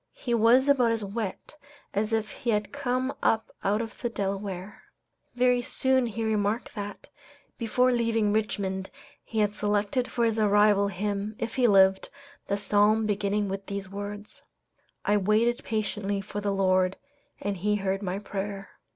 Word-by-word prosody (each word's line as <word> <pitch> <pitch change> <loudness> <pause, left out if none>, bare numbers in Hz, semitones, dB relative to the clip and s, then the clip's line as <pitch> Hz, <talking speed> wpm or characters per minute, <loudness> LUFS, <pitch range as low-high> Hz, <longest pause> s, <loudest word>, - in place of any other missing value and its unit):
He 240 - -3
was 235 +4 +5
about 255 -5 +4
as 225 -2 -1
wet 205 +6 -5 0.4
as 210 +2 0
if 220 -2 0
he 240 - -5
had 210 -2 0
come 260 -1 -1
up 225 0 +1
out 210 +3 +1
of 225 - -10
the 240 - -1
Delaware. 195 -2 -4 0.5
Very 250 0 +3
soon 260 -1 +1
he 225 0 -4
remarked 215 +1 0
that, 205 -2 -7 0.5
before 250 +2 +2
leaving 225 -3 +1
Richmond 195 -3 -1 0.3
he 220 -2 -1
had 210 0 +1
selected 210 +4 0
for 235 - +1
his 225 -1 +1
arrival 205 -1 +4
hymn 200 +2 -3
(if 230 0 -4
he 250 -2 +3
lived) 190 -2 +4 0.4
the 200 - 0
Psalm 210 +2 +3
beginning 205 0 0
with 195 0 -5
these 200 -1 -5
words: 205 +1 -7 0.6
"I 210 - +3
waited 215 +4 +2
patiently 205 -2 -2
for 205 +1 -5
the 200 0 0
Lord, 185 -1 +2 0.4
and 200 -1 -3
He 210 +4 +1
heard 195 -1 -1
my 190 -1 -2
prayer." 200 -1 -5
210 Hz, 160 wpm, -27 LUFS, 200-230 Hz, 0.6 s, was